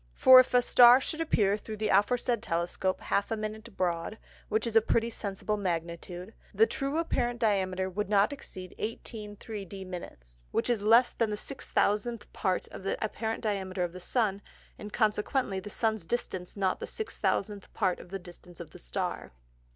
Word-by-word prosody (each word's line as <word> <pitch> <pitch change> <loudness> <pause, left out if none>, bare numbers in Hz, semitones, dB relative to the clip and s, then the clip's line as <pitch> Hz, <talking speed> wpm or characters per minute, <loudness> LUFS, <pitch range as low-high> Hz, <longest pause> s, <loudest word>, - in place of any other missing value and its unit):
For 260 0 +9
if 255 0 +3
a 245 - +5
Star 245 +1 +8
should 315 +4 -4
appear 210 -10 +2
thro' 215 +1 -7
the 215 0 -2
aforesaid 235 +3 +2
Telescope 175 0 -1
half 200 - 0
a 225 - -1
Minute 215 0 -6
broad 175 +3 -1 0.3
(which 220 - +1
is 230 -1 -3
a 225 - +8
pretty 230 +1 +1
sensible 210 0 -3
Magnitude) 175 +1 -4 0.2
the 220 +3 +6
true 275 +5 -2
apparent 245 -7 0
Diameter 190 -4 +1
would 200 +2 -3
not 205 +5 +3
exceed 185 -9 -9
18 215 -1 -5
3d 195 -3 -7
Minutes, - - -9
which 230 - 0
is 230 -4 0
less 230 +4 +5
than 230 -2 0
the 210 - -1
6000th 225 -2 -1
part 185 -3 -1
of - - -9
the 195 - -2
apparent 220 +2 -3
Diameter 190 -3 -1
of 175 -1 -3
the 185 - -8
Sun, 200 0 0 0.4
and 210 - -8
consequently 210 -1 0
the 190 - -8
Sun's 220 -1 0
Distance 190 -6 -3
not 190 -2 0
the - - -5
6000th 210 - -2
part 185 -2 +1
of - - -12
the 195 - -4
Distance 175 -1 -14
of 165 -3 -9
the - - -12
Star. - - -4
210 Hz, 180 wpm, -29 LUFS, 185-230 Hz, 0.4 s, For